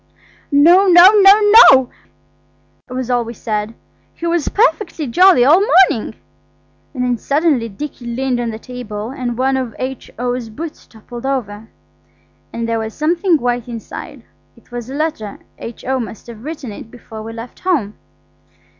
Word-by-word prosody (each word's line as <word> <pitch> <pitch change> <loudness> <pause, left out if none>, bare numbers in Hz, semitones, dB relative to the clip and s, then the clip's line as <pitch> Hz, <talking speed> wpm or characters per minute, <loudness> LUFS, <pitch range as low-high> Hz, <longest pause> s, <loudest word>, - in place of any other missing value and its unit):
"No, 340 +7 +5
no, 355 +1 +8
NO, 415 0 +5 0.2
NO!" 260 -2 +3 1.0
we 255 -1 -4
all 240 -2 -1
said. 215 0 -4 0.4
"He 340 - -7
was 335 -2 -1
perfectly 425 -7 0
jolly 345 0 +4
all 310 +7 +6
the 405 - -1 0.2
morning." 220 - -5 0.8
Then 250 -2 -1
suddenly 285 -5 0
Dicky 245 +3 -8
leaned 250 +1 -2
on 240 -1 -2
the 220 - -6
table 225 -2 -7
and 245 -3 -5
one 265 +1 +1
of 255 -3 -4
H.O.'s 250 -2 -5
boots 310 +8 -9
toppled 240 +3 -9
over, 225 -5 -4 0.8
and 230 0 -4
there 230 0 -1
was 220 0 -6
something 340 +3 +1
white 245 -3 -2
inside 230 -2 -9 0.3
It - - -24
was 240 0 -7
a 270 - -6
letter. 290 -10 -3 0.2
H.O. 255 +3 -4
must 225 -3 -8
have 230 -2 -12
written 295 -5 -7
it 205 - -11
before 225 -2 -11
we 225 +1 -8
left 230 +2 -10
home. 285 - -1
250 Hz, 150 wpm, -17 LUFS, 230-305 Hz, 1.0 s, no